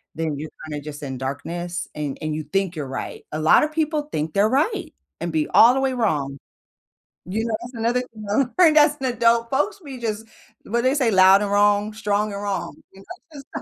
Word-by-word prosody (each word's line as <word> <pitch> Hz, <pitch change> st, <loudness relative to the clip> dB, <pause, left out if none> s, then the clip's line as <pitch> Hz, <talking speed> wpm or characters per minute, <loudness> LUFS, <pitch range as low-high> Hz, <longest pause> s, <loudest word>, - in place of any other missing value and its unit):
then 160 Hz, -3 st, -2 dB
you're 155 Hz, +1 st, -6 dB, 0.2 s
kinda 145 Hz, -2 st, -5 dB
just 150 Hz, -1 st, -8 dB
in 130 Hz, -2 st, -5 dB
darkness, 170 Hz, +6 st, -4 dB
and 145 Hz, -3 st, -4 dB
and 155 Hz, -1 st, -2 dB
you 155 Hz, -, -4 dB
think 195 Hz, -3 st, 0 dB
you're 145 Hz, -3 st, -4 dB
right 130 Hz, -, -6 dB
a 155 Hz, -, -3 dB
lotta 160 Hz, -, +4 dB
people 305 Hz, -1 st, -1 dB
think 155 Hz, +1 st, -3 dB
they're 205 Hz, +2 st, +3 dB
right, 315 Hz, -, 0 dB, 0.3 s
and 170 Hz, -1 st, -2 dB
be 155 Hz, -1 st, 0 dB
all 235 Hz, +2 st, +8 dB
the 270 Hz, -, 0 dB
way 265 Hz, -1 st, 0 dB
wrong. 150 Hz, -, -1 dB, 0.9 s
You 215 Hz, +5 st, -2 dB
know, 225 Hz, -, -1 dB
that's 240 Hz, +2 st, -9 dB
another 235 Hz, +2 st, 0 dB
thing 220 Hz, -4 st, -11 dB, 0.3 s
I -, -, +8 dB
learned 310 Hz, -2 st, +6 dB
as 295 Hz, 0 st, +4 dB
an 270 Hz, -, -3 dB
adult, 230 Hz, 0 st, +2 dB
folks 295 Hz, +10 st, 0 dB
be 270 Hz, -3 st, -8 dB
just 220 Hz, -1 st, -3 dB, 0.4 s
what 235 Hz, -, -2 dB
do -, -, -7 dB
they 260 Hz, +2 st, +2 dB
say, 255 Hz, -6 st, +2 dB
"Loud 190 Hz, 0 st, +6 dB
and 200 Hz, -, -3 dB
wrong? 205 Hz, +1 st, +3 dB
Strong 210 Hz, -1 st, -1 dB
and 200 Hz, -, -5 dB
wrong?" 200 Hz, -1 st, -3 dB, 0.2 s
You 195 Hz, 0 st, -15 dB, 0.3 s
know? 275 Hz, -2 st, -8 dB
210 Hz, 215 wpm, -22 LUFS, 160-250 Hz, 0.9 s, all